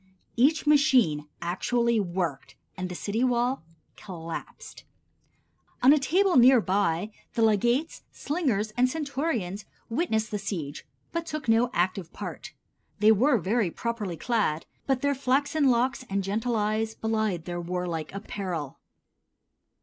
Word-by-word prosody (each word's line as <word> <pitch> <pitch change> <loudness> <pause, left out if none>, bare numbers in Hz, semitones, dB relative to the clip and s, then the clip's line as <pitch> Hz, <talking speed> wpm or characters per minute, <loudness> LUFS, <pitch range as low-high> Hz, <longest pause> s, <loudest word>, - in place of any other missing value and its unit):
Each 285 +7 +3
machine 260 - +4 0.2
actually 235 +6 +1
worked, 175 -7 -3 0.2
and 185 -1 -4
the 180 - -6
city 215 +6 -1
wall 250 +1 +1 0.3
collapsed. 165 -4 -8 1.0
On 265 +3 +8
a 305 - +3
table 365 +5 +3
near 250 +1 +7
by 200 -1 0 0.2
the 230 - +2
legates, 240 - +1
slingers 255 - -1
and 250 +1 +3
centurions 270 - -2 0.3
witnessed 225 -6 0
the 210 - -2
siege, 165 -8 -5 0.2
but 335 0 -3
took 305 -4 -5
no 230 +2 +4
active 180 0 -1
part. - - -7 0.5
They 210 +1 +5
were 245 +5 +4
very 210 +1 0
properly 210 -3 -4
clad, 205 -6 0 0.2
but 270 -1 0
their 285 0 +3
flaxen 280 +2 +1
locks 255 +2 +1
and 195 0 -1
gentle 220 +5 -1
eyes 220 +1 0
belied 220 -6 -1
their 175 -1 -4
warlike 175 -2 -3
apparel. 185 -7 -5
220 Hz, 130 wpm, -27 LUFS, 185-255 Hz, 1.0 s, On